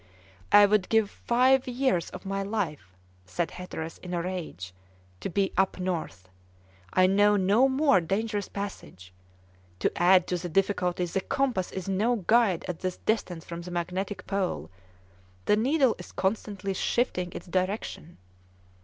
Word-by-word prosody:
"I 205 Hz, 0 st, +9 dB
would 205 Hz, -2 st, +2 dB
give 220 Hz, -2 st, +2 dB
five 255 Hz, +2 st, +2 dB
years 250 Hz, -8 st, 0 dB
of 185 Hz, -, -10 dB
my 195 Hz, 0 st, -2 dB
life," 170 Hz, -, -4 dB, 0.3 s
said 165 Hz, -, -2 dB
Hatteras, 165 Hz, -3 st, -7 dB
in 180 Hz, -1 st, -5 dB
a 170 Hz, -, 0 dB
rage, 165 Hz, -, -5 dB, 0.5 s
"to -, -, -4 dB
be 195 Hz, +1 st, 0 dB
up 190 Hz, -1 st, +2 dB
north. 165 Hz, -, -3 dB, 0.6 s
I 185 Hz, -, +4 dB
know 205 Hz, +2 st, +4 dB
no 205 Hz, +7 st, +4 dB
more 265 Hz, -, +4 dB
dangerous 205 Hz, +4 st, -2 dB
passage. 95 Hz, -, -7 dB, 0.6 s
To -, -, +1 dB
add 180 Hz, +1 st, +5 dB
to 180 Hz, -, -1 dB
the 175 Hz, 0 st, -5 dB
difficulty, 180 Hz, -1 st, +1 dB
the 185 Hz, +2 st, -2 dB
compass 255 Hz, -7 st, -1 dB
is 190 Hz, -1 st, -5 dB
no 210 Hz, +6 st, +1 dB
guide 220 Hz, -3 st, +2 dB
at 175 Hz, -3 st, -4 dB
this 185 Hz, -1 st, -3 dB
distance 180 Hz, -7 st, -2 dB
from 170 Hz, 0 st, -6 dB
the 175 Hz, -, -8 dB
magnetic 185 Hz, +3 st, -3 dB
pole: 180 Hz, -, -2 dB, 0.7 s
the -, -, +4 dB
needle 260 Hz, +2 st, +3 dB
is 180 Hz, -, -10 dB
constantly 200 Hz, 0 st, -2 dB
shifting 180 Hz, -3 st, 0 dB
its -, -, -7 dB
direction." 185 Hz, -2 st, -3 dB
190 Hz, 150 wpm, -27 LUFS, 175-210 Hz, 0.7 s, I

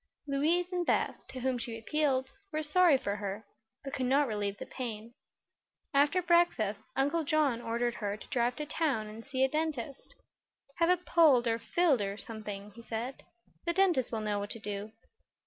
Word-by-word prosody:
Louise 300 Hz, +5 st, +2 dB
and 355 Hz, -1 st, 0 dB
Beth, -, -, 0 dB
to 255 Hz, -, -7 dB
whom 255 Hz, -1 st, 0 dB
she 230 Hz, -1 st, -4 dB
appealed, 265 Hz, +2 st, 0 dB, 0.2 s
were 310 Hz, 0 st, -1 dB
sorry 325 Hz, -1 st, +5 dB
for 200 Hz, -5 st, -3 dB
her, 205 Hz, +1 st, -5 dB, 0.4 s
but 275 Hz, 0 st, -6 dB
could 255 Hz, -2 st, -1 dB
not 280 Hz, +2 st, +3 dB
relieve 205 Hz, -2 st, -2 dB
the -, -, -6 dB
pain. 230 Hz, -2 st, -6 dB, 0.8 s
After 295 Hz, +6 st, +3 dB
breakfast 335 Hz, -, +2 dB
Uncle 285 Hz, +5 st, +1 dB
John 285 Hz, -5 st, +2 dB
ordered 235 Hz, +1 st, -1 dB
her 205 Hz, -3 st, -3 dB
to -, -, -13 dB
drive 245 Hz, 0 st, +1 dB
to 300 Hz, -, -4 dB
town 295 Hz, -7 st, 0 dB
and 215 Hz, +2 st, -9 dB
see 260 Hz, +1 st, 0 dB
a -, -, +5 dB
dentist. 290 Hz, -3 st, -3 dB, 0.6 s
"Have 335 Hz, 0 st, +3 dB
it 360 Hz, 0 st, +2 dB
pulled, 295 Hz, -8 st, +5 dB
or 230 Hz, 0 st, +1 dB
filled, 300 Hz, -1 st, +2 dB
or 200 Hz, 0 st, -2 dB
something," 210 Hz, -2 st, -7 dB
he 235 Hz, -, -12 dB
said. 230 Hz, +3 st, -5 dB, 0.5 s
"The 340 Hz, -, +2 dB
dentist 350 Hz, -9 st, +3 dB
will 225 Hz, -2 st, -2 dB
know 210 Hz, -1 st, -1 dB
what 205 Hz, 0 st, -4 dB
to 230 Hz, -, -5 dB
do." 205 Hz, 0 st, -5 dB
255 Hz, 180 wpm, -31 LUFS, 220-305 Hz, 0.8 s, sorry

